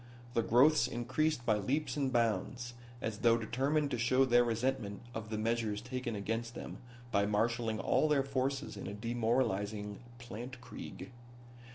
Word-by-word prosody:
The 115 Hz, -, +3 dB
growths 130 Hz, +8 st, +5 dB
increased 130 Hz, +3 st, 0 dB
by 110 Hz, -3 st, +3 dB
leaps 140 Hz, +11 st, -1 dB
and 140 Hz, -3 st, 0 dB
bounds, 120 Hz, +1 st, 0 dB, 0.3 s
as 110 Hz, -1 st, -2 dB
though 115 Hz, -1 st, +5 dB
determined 140 Hz, +6 st, 0 dB
to 120 Hz, -, -1 dB
show 130 Hz, +3 st, +4 dB
their 120 Hz, -1 st, +5 dB
resentment 115 Hz, -2 st, -1 dB
of 110 Hz, -2 st, -5 dB
the 110 Hz, -, -2 dB
measures 110 Hz, -1 st, 0 dB
taken 125 Hz, 0 st, -4 dB
against 115 Hz, +3 st, -3 dB
them -, -, -7 dB, 0.3 s
by 100 Hz, -1 st, +3 dB
marshalling 110 Hz, +1 st, +1 dB
all 155 Hz, -, +3 dB
their 145 Hz, -2 st, +3 dB
forces 135 Hz, +1 st, -1 dB
in -, -, -6 dB
a 100 Hz, -, -5 dB
demoralizing 110 Hz, -3 st, 0 dB, 0.2 s
plantkrieg. 120 Hz, +3 st, -8 dB
120 Hz, 150 wpm, -34 LUFS, 110-130 Hz, 0.3 s, growths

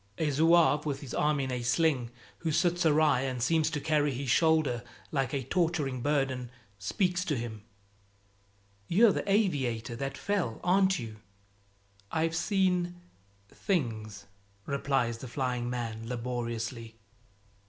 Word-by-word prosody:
A 155 Hz, -2 st, 0 dB
zouave 160 Hz, 0 st, +4 dB
with 140 Hz, -3 st, -3 dB
his 140 Hz, -, -8 dB
arm 150 Hz, -1 st, +1 dB
in 130 Hz, -1 st, -2 dB
a 125 Hz, -1 st, -2 dB
sling, 125 Hz, 0 st, +1 dB, 0.3 s
who 165 Hz, -, -1 dB
sits 175 Hz, +2 st, +2 dB
awry 150 Hz, -4 st, +4 dB
and 130 Hz, -2 st, -2 dB
seems 155 Hz, +5 st, +2 dB
to 155 Hz, -2 st, -2 dB
carry 150 Hz, -1 st, +1 dB
his 130 Hz, 0 st, -2 dB
shoulder 155 Hz, -5 st, +3 dB, 0.3 s
like 135 Hz, -4 st, 0 dB
a 135 Hz, -2 st, -2 dB
torturing 150 Hz, -4 st, 0 dB
burden, 135 Hz, -3 st, 0 dB, 0.3 s
speaks 180 Hz, -, 0 dB
to 150 Hz, -7 st, 0 dB
him: 115 Hz, -2 st, -5 dB, 1.3 s
"You're 215 Hz, +5 st, +5 dB
the 200 Hz, -, -2 dB
aviator 130 Hz, -, 0 dB
that 135 Hz, +1 st, -4 dB
fell, 185 Hz, -, -1 dB
aren't 190 Hz, +1 st, +3 dB
you?" 110 Hz, -3 st, -7 dB, 0.9 s
"I've 165 Hz, 0 st, 0 dB
seen 180 Hz, 0 st, +1 dB, 0.5 s
things," 110 Hz, -, -2 dB, 0.4 s
replies 135 Hz, -4 st, 0 dB
the 130 Hz, -, -7 dB
flying 125 Hz, -1 st, -2 dB
man 115 Hz, -2 st, -4 dB
laboriously. 115 Hz, -1 st, -4 dB
140 Hz, 130 wpm, -30 LUFS, 120-165 Hz, 1.3 s, You're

